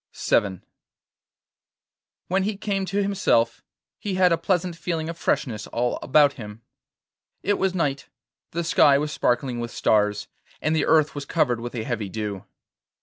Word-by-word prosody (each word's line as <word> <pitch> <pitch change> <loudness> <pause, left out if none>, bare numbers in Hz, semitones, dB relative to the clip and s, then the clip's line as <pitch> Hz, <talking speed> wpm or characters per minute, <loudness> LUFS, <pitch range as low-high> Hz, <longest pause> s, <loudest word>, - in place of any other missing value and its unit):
VII 95 -3 +1 1.7
When 190 +2 +1
he 200 +1 -2
came 195 -2 -2
to 200 +2 0
himself, 185 -13 +1 0.4
he 205 -3 -3
had 185 -1 +4
a 170 - +3
pleasant 180 -2 0
feeling 165 -1 -3
of 165 - -5
freshness 135 -9 -1
all 120 +1 -1
about 145 0 +4
him. 105 +1 -10 0.8
It 205 +1 +1
was 190 -1 0
night, 140 -6 -1 0.4
the 170 +1 -3
sky 145 -4 +5
was 150 +1 -2
sparkling 120 -2 0
with 120 0 -3
stars, 105 -2 +1 0.3
and 155 +1 0
the 160 - +1
earth 155 -2 +4
was 145 -1 -6
covered 135 -6 +1
with 120 +1 -6
a 115 - -2
heavy 110 -5 -3
dew. 105 -2 -5
145 Hz, 155 wpm, -24 LUFS, 115-180 Hz, 1.7 s, sky